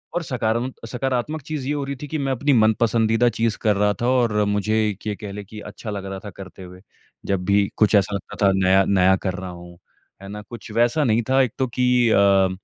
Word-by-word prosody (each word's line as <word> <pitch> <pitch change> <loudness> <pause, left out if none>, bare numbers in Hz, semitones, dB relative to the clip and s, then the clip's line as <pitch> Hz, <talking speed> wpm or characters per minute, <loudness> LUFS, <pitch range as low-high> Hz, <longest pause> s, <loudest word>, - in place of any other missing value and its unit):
और 175 - -1
सकारम 120 -1 -1 0.2
सकारात्मक 135 +4 -2
चीज़ 145 -1 -5
ये 145 - 0
हो 145 - -2
रही 140 0 -4
थी 145 - -6
कि 155 +2 -3
मैं 135 - 0
अपनी 140 +3 +1
मनपसंदीदा 115 +1 +3
चीज़ 115 -1 0
कर 105 -2 +2
रहा 105 +1 +2
था 120 - +1
और 115 -5 +2
मुझे 105 +2 -1 0.2
एक 105 +1 -7
ये 105 - -2
कह 100 - -5
लें 105 +1 -7
कि 105 +2 -11
अच्छा 110 - -9
लग 100 -2 -5
रहा 95 0 -6
था 105 - -5
करते 95 0 -10
हुए। 90 0 -12 0.4
जब 95 -2 -1
भी 100 +1 +3
कुछ 105 0 +3
ऐसा 100 0 +2
लगता 100 - -7
था, 100 - +5
नया 95 0 +4
नया 95 -1 +3
कर 95 - 0
रहा 90 0 -6
हूँ। 85 0 -11 0.4
है 95 - -10
ना? 105 +1 -7
कुछ 115 +1 -11
वैसा 120 +7 +2
नहीं 115 -2 +2
था, 135 +1 +4
एक 125 - +1
तो 130 -1 0
कि 125 -1 +2
अ, - - +3
अ, 100 -1 +4
110 Hz, 240 wpm, -22 LUFS, 100-125 Hz, 0.4 s, था